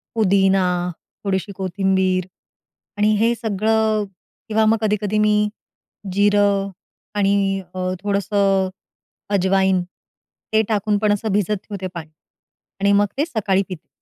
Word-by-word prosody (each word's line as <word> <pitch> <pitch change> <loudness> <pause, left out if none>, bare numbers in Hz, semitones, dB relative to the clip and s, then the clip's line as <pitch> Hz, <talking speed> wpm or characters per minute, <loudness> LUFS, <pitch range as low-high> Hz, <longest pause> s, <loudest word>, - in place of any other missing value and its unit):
पुदिना 195 -2 +3 0.6
थोडीशी 195 0 -1
कोथिंबीर 190 -1 0 0.7
आणि 210 +1 +3
हे 230 +2 +3
सगळं 220 0 +1 0.5
किंवा 220 0 +3
मग 225 +1 +4
कधी-कधी 210 0 0
मी 210 0 +3 0.8
जिरं 200 0 +3 0.5
आणि 195 -1 +1
अ, 185 0 -1
थोडंसं 200 -1 +1 0.7
अजवाईन. 190 -1 +2 0.7
ते 220 - +5
टाकून 210 -1 +1
पण 210 0 +2
असं 210 0 -2
भिजत 205 +1 +1
ठेवते 195 -3 -5
पाणी. 160 -2 -8 0.7
आणि 200 - +3
मग 205 0 +4
ते 295 - +2
सकाळी 210 - 0
पिते 180 -4 -8
200 Hz, 115 wpm, -21 LUFS, 190-210 Hz, 0.8 s, ते